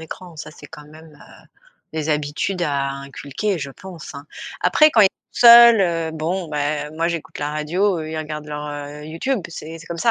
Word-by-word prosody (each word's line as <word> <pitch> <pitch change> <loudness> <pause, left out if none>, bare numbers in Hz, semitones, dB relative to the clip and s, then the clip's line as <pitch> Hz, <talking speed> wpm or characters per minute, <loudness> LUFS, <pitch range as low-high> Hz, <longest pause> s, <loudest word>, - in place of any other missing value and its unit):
écran. 165 +1 -10
Ça, 150 - -8
c'est - - -13
quand 150 - -12
même, 155 0 -15
heu, 145 - -17 0.5
des 160 -1 -3
habitudes 150 +5 -1
à 140 -3 0
inculquer 140 +7 -4
je 140 -1 -5
pense, 175 -1 -11
hein. 140 +1 -9 0.3
Après, 305 0 +5
quand 230 - +4
ils 195 - +7 0.2
seuls, 235 -2 +9
heu, 165 -3 0
bon, 165 +2 -3
bah, 150 0 -2
moi 165 +2 -1
j'écoute 170 -2 -5
la 145 0 -2
radio, 170 +5 0
eux 155 - -6
ils 160 - -5
regardent 150 -1 -5
leur, 150 0 -5
heu, 145 0 -7
YouTube, 165 - -2
c'est 165 0 -8
c'est 165 - -14
comme 170 -1 -6
ça. 230 - +3
155 Hz, 200 wpm, -21 LUFS, 150-175 Hz, 0.5 s, seuls